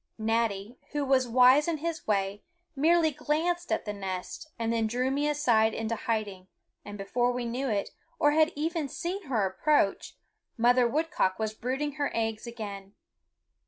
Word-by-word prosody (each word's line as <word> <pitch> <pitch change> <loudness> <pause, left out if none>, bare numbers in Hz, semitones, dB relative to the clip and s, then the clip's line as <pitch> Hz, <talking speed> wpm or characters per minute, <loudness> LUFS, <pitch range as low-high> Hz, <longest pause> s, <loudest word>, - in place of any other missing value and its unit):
Natty, 225 0 -1
who 290 -1 0
was 260 -2 +3
wise 255 +5 +5
in 335 -2 0
his 330 +1 -4
way, 200 -1 0 0.3
merely 320 +3 +3
glanced 320 +4 -1
at - - 0
the 210 - -3
nest 190 +8 -6
and 230 0 -1
then 225 -1 +1
drew 250 +4 0
me 290 +2 +1
aside 235 -7 +2
into 225 0 -2
hiding, 210 -5 -3 0.4
and 205 0 -8
before 240 +5 0
we 245 -1 -3
knew 250 +3 -2
it, 205 -2 -1 0.3
or 295 - +4
had 315 +2 +3
even 315 0 -2
seen 350 +6 -4
her 225 -7 +1
approach, 195 +3 +1 0.4
Mother 245 +1 +4
Woodcock 270 - 0
was 220 -1 -2
brooding 270 +6 -3
her 285 - +1
eggs 225 0 -2
again. 205 -4 -7
245 Hz, 160 wpm, -28 LUFS, 215-295 Hz, 0.4 s, wise